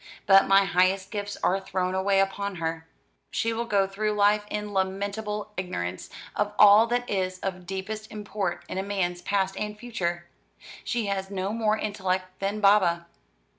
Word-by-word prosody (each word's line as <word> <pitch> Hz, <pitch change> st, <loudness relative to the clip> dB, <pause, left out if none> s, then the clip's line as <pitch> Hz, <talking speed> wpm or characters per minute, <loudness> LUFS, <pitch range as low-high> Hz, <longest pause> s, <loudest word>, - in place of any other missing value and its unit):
But 195 Hz, 0 st, +6 dB
my 195 Hz, 0 st, +5 dB
highest 190 Hz, +1 st, +2 dB
gifts 205 Hz, -2 st, -4 dB
are 190 Hz, +2 st, +3 dB
thrown 185 Hz, -1 st, -2 dB
away 195 Hz, +1 st, +2 dB
upon 200 Hz, 0 st, -2 dB
her. 165 Hz, -1 st, -4 dB, 0.4 s
She 230 Hz, 0 st, -1 dB
will 235 Hz, +1 st, -2 dB
go 200 Hz, -4 st, +2 dB
through 210 Hz, +2 st, -2 dB
life 210 Hz, 0 st, +3 dB
in 210 Hz, -1 st, -4 dB
lamentable 205 Hz, +2 st, -2 dB
ignorance 90 Hz, -, -4 dB, 0.3 s
of -, -, -1 dB
all 210 Hz, +2 st, +8 dB
that 245 Hz, +1 st, -1 dB
is 185 Hz, -2 st, -1 dB
of 185 Hz, -2 st, -4 dB
deepest 215 Hz, +3 st, -5 dB
import 205 Hz, -3 st, -4 dB
in 190 Hz, +1 st, -4 dB
man's 180 Hz, -3 st, -1 dB
past 195 Hz, 0 st, 0 dB
and 210 Hz, 0 st, -4 dB
future. 175 Hz, -7 st, -3 dB, 0.6 s
She 235 Hz, -3 st, -1 dB
has 195 Hz, -1 st, -2 dB
no 195 Hz, +1 st, -2 dB
more 220 Hz, -1 st, +1 dB
intellect 185 Hz, -3 st, -2 dB
than 200 Hz, +2 st, -2 dB
Baba." 190 Hz, -5 st, +4 dB
195 Hz, 160 wpm, -26 LUFS, 185-210 Hz, 0.6 s, all